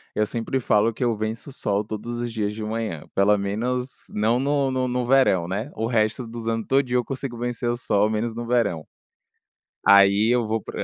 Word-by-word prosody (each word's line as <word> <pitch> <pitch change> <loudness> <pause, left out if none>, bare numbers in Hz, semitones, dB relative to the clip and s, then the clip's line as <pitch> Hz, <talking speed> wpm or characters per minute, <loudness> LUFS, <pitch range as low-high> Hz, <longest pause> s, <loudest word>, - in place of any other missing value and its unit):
eu 105 - +2
sempre 120 +4 -2
falo 110 0 +2
que 125 - -4
eu 120 -1 +2
venço 110 +5 -4
o - - -10
sol 100 -4 -1
todos 110 +3 -5
os 120 -1 -3
dias 105 -2 -2
de 110 0 -6
manhã, 110 -7 -3
pelo 100 +2 +4
menos 120 +6 -3
não 110 +3 +1
no 140 0 +1
no 130 0 0
no 125 0 -1
verão, 125 -9 +4
né, 100 +9 -3
o 110 - -2
resto 115 +1 0
dos 115 0 -7
ano 115 -1 -1
todinho 130 -2 +2
eu - - -1
consigo 130 -1 -5
vencer 120 0 -2
o 120 - 0
sol, 105 -3 +1
menos 110 +1 -1
no 120 +1 -6
verão, 115 -10 0 1.0
aí 100 +2 +6
eu 120 - +1
vou 110 +1 -1
pra - - -9
115 Hz, 210 wpm, -24 LUFS, 105-125 Hz, 1.0 s, aí